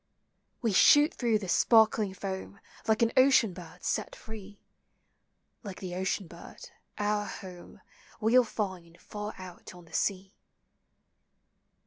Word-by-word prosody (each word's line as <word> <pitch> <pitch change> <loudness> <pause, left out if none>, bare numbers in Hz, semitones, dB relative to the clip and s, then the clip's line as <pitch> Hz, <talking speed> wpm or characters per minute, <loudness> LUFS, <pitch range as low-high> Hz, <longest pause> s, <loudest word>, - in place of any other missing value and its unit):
We 225 -3 +1
shoot 295 - +6
through 235 -3 +1
the 200 -3 -7
sparkling 220 -1 +3
foam, 195 +1 -6 0.3
Like 220 +1 +3
an 230 - +2
ocean 255 -6 +5
bird 180 0 -12
set - - -2
free, 210 -2 -11 0.5
— - - -48
Like 200 -4 -8
the 185 -2 -6
ocean 190 +2 -2
bird, 170 +1 -12 0.3
our 205 0 0
home 180 -2 -10 0.4
We 220 +1 +1
'11 250 -3 +5
find 180 -5 -5
far 210 0 -7
out 185 0 -11
on 175 -1 -14
the 165 - -20
sea. 195 0 -1
200 Hz, 135 wpm, -29 LUFS, 185-220 Hz, 0.5 s, shoot